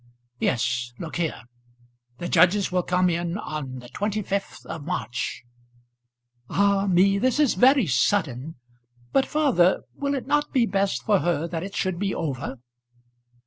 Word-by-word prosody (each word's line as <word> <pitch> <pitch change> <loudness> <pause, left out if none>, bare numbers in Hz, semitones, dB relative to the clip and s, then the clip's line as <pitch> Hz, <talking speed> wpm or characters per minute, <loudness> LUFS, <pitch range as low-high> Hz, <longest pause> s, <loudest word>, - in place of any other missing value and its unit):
"Yes; 120 0 0
look 165 -1 -6
here: 160 -9 -2 0.7
the 175 - -4
judges 185 +4 +4
will 180 0 +2
come 180 +1 +1
in 170 +1 -1
on 155 -9 -5
the 125 -1 -11
25th 205 0 -3
of 160 - -6
March." 150 -9 -3 1.1
"Ah 200 0 +2
me 195 +2 +4
this 255 +5 +1
is 295 -5 +4
very 260 -1 +5
sudden. 140 0 0 0.6
But, 270 - +2
father, 260 - +3
will 280 0 -2
it 265 - -4
not 295 0 +1
be 250 -3 +3
best 195 -1 0
for 205 -3 +3
her 170 -2 0
that 165 -1 -3
it 195 +3 -7
should 185 -2 -1
be 200 -1 -1
over?" 135 -4 -4
185 Hz, 145 wpm, -25 LUFS, 160-205 Hz, 1.1 s, very